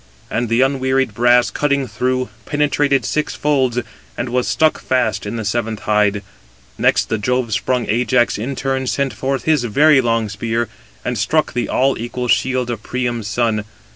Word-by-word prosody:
And 120 Hz, +1 st, -1 dB
the 115 Hz, +2 st, +3 dB
unwearied 130 Hz, -2 st, +1 dB
brass 120 Hz, +2 st, +4 dB
cutting 140 Hz, -2 st, 0 dB
through, 130 Hz, +3 st, -1 dB, 0.2 s
penetrated 145 Hz, -1 st, +1 dB
six 150 Hz, -, -1 dB
folds, 135 Hz, -5 st, +1 dB, 0.4 s
and 120 Hz, +1 st, -3 dB
was 125 Hz, 0 st, 0 dB
stuck 155 Hz, -1 st, +2 dB
fast 125 Hz, -5 st, 0 dB
in 105 Hz, -, -4 dB
the 110 Hz, -2 st, -4 dB
seventh 110 Hz, 0 st, -2 dB
hide. 105 Hz, -1 st, +1 dB, 0.5 s
Next, -, -, +1 dB
Jove 125 Hz, 0 st, 0 dB
sprung 125 Hz, +3 st, 0 dB
Ajax 120 Hz, 0 st, +1 dB
in 130 Hz, +5 st, -3 dB
turn 135 Hz, 0 st, -2 dB
sent 140 Hz, 0 st, 0 dB
forth 135 Hz, -2 st, -2 dB
his 155 Hz, -3 st, +2 dB
very 145 Hz, +5 st, +5 dB
long 115 Hz, -2 st, 0 dB
spear, 115 Hz, +2 st, -2 dB, 0.4 s
and 125 Hz, -3 st, -2 dB
struck 155 Hz, +9 st, +1 dB
the 120 Hz, -, -2 dB
all 135 Hz, +1 st, +1 dB
equal 125 Hz, +2 st, -4 dB
shield 125 Hz, 0 st, +1 dB
of 115 Hz, -3 st, -5 dB
Priam's 120 Hz, -3 st, -3 dB
son. 110 Hz, 0 st, 0 dB
125 Hz, 165 wpm, -18 LUFS, 115-135 Hz, 0.5 s, very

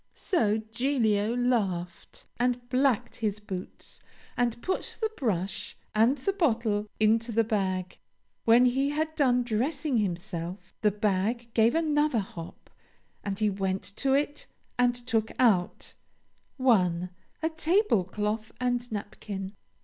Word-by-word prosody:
So 220 Hz, -, +1 dB
Giglio 220 Hz, -1 st, 0 dB
laughed 195 Hz, -9 st, -1 dB
and 245 Hz, 0 st, 0 dB
blacked 255 Hz, -2 st, +1 dB
his 210 Hz, -3 st, -1 dB
boots, 190 Hz, -3 st, -7 dB, 0.4 s
and 240 Hz, -1 st, 0 dB
put 375 Hz, -, -3 dB
the 440 Hz, -1 st, 0 dB
brush 190 Hz, -, -2 dB, 0.2 s
and 230 Hz, +6 st, +4 dB
the 390 Hz, +9 st, -1 dB
bottle 225 Hz, -, +1 dB
into 225 Hz, +2 st, +3 dB
the 230 Hz, +1 st, +3 dB
bag. 190 Hz, -4 st, -2 dB, 0.4 s
"When 235 Hz, +2 st, +6 dB
he 265 Hz, +3 st, +2 dB
had 315 Hz, +2 st, -1 dB
done 250 Hz, -4 st, +3 dB
dressing 265 Hz, +4 st, 0 dB
himself, 180 Hz, -2 st, -3 dB
the 210 Hz, -, +5 dB
bag 210 Hz, +3 st, -1 dB
gave 230 Hz, +3 st, +4 dB
another 300 Hz, -4 st, +2 dB
hop, 180 Hz, -5 st, -6 dB, 0.5 s
and 200 Hz, -1 st, -3 dB
he 210 Hz, -1 st, +2 dB
went 190 Hz, -1 st, -1 dB
to 270 Hz, -1 st, +1 dB
it 290 Hz, +1 st, -1 dB, 0.3 s
and 245 Hz, 0 st, +3 dB
took 235 Hz, -3 st, -1 dB
out 200 Hz, -8 st, +2 dB, 0.6 s
1. 180 Hz, -9 st, +2 dB, 0.3 s
A 320 Hz, -, +2 dB
tablecloth 220 Hz, -, +1 dB
and 245 Hz, -1 st, -1 dB
napkin. 200 Hz, -2 st, -5 dB
225 Hz, 125 wpm, -28 LUFS, 200-255 Hz, 0.6 s, When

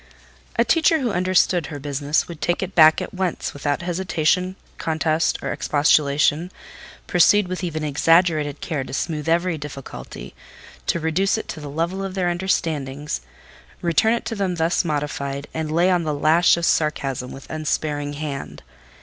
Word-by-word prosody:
A -, -, +3 dB
teacher 325 Hz, -1 st, +3 dB
who 245 Hz, -4 st, 0 dB
understood 185 Hz, -3 st, +2 dB
her 145 Hz, -, -6 dB
business 145 Hz, +1 st, -1 dB
would 170 Hz, -3 st, -9 dB
take 175 Hz, +2 st, 0 dB
it 190 Hz, +1 st, -5 dB
back 160 Hz, -1 st, +6 dB
at -, -, -8 dB
once, 185 Hz, -2 st, -2 dB
without 145 Hz, +2 st, -2 dB
hesitation, 180 Hz, 0 st, 0 dB, 0.2 s
contest, 160 Hz, 0 st, 0 dB
or -, -, -2 dB
expostulation—proceed 155 Hz, +6 st, +1 dB
with 185 Hz, +1 st, -4 dB
even 160 Hz, -3 st, -3 dB
exaggerated 155 Hz, 0 st, +2 dB
care 150 Hz, -5 st, -2 dB
to -, -, -9 dB
smoothe 155 Hz, -1 st, -2 dB
every 170 Hz, -1 st, +1 dB
difficulty, 140 Hz, -, -8 dB, 0.5 s
to 170 Hz, -, +1 dB
reduce 165 Hz, +6 st, +1 dB
it 220 Hz, -, -5 dB
to 155 Hz, -, -5 dB
the 145 Hz, -1 st, -7 dB
level 170 Hz, +6 st, -2 dB
of 195 Hz, -1 st, -5 dB
their 180 Hz, -2 st, +1 dB
understandings, 150 Hz, -, -2 dB, 0.6 s
return 175 Hz, +7 st, +3 dB
it 235 Hz, -, -5 dB
to 230 Hz, -, -3 dB
them 195 Hz, -4 st, -1 dB
thus 165 Hz, +1 st, +1 dB
modified, 145 Hz, -3 st, -3 dB
and 160 Hz, -1 st, -3 dB
lay 175 Hz, +4 st, +3 dB
on 180 Hz, -1 st, +2 dB
the 155 Hz, -3 st, -2 dB
lash 160 Hz, +4 st, +4 dB
of 170 Hz, -, -1 dB
sarcasm 135 Hz, -6 st, 0 dB
with 135 Hz, -, -10 dB
unsparing 150 Hz, -2 st, -2 dB
hand. 140 Hz, -, -6 dB
160 Hz, 160 wpm, -22 LUFS, 145-180 Hz, 0.6 s, back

